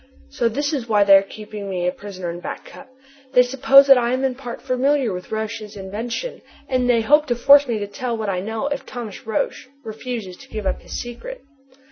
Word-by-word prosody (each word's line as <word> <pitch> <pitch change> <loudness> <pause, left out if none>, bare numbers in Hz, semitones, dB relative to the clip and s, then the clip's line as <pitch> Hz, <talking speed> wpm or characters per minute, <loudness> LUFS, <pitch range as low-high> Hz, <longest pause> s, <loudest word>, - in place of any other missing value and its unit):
So 235 - +1
this 285 +6 -2
is 245 -5 -3
why 210 -2 +4
they 200 -1 +7
are 195 - +7
keeping 210 0 -8
me 180 -2 -2
a 180 - +2
prisoner 185 -3 -7
in 170 - -7
Back - - -7
Cup! 275 - -13 0.4
They 250 - +7
suppose 270 +2 +6
that 270 -2 +7
I 240 0 0
am 260 +1 -1
in 265 -1 +1
part 245 -2 -8
familiar 265 -2 +1
with 180 0 -8
Roch's 220 -1 -4
invention, 225 - -5 0.3
and 255 -1 0
they 235 -2 +4
hope 295 +6 +4
to 240 - +1
force 280 +4 +6
me 235 -2 -1
to 205 - -3
tell 240 +2 -4
what 220 -1 -3
I 190 -2 -1
know 220 +6 -3
if 285 0 -2
Thomas 230 -5 -8
Roch 220 - 0 0.3
refuses 220 -4 -6
to - - -16
give 215 -2 -5
up 190 - -1
his - - -6
secret. 480 - -8
235 Hz, 220 wpm, -21 LUFS, 205-265 Hz, 0.4 s, they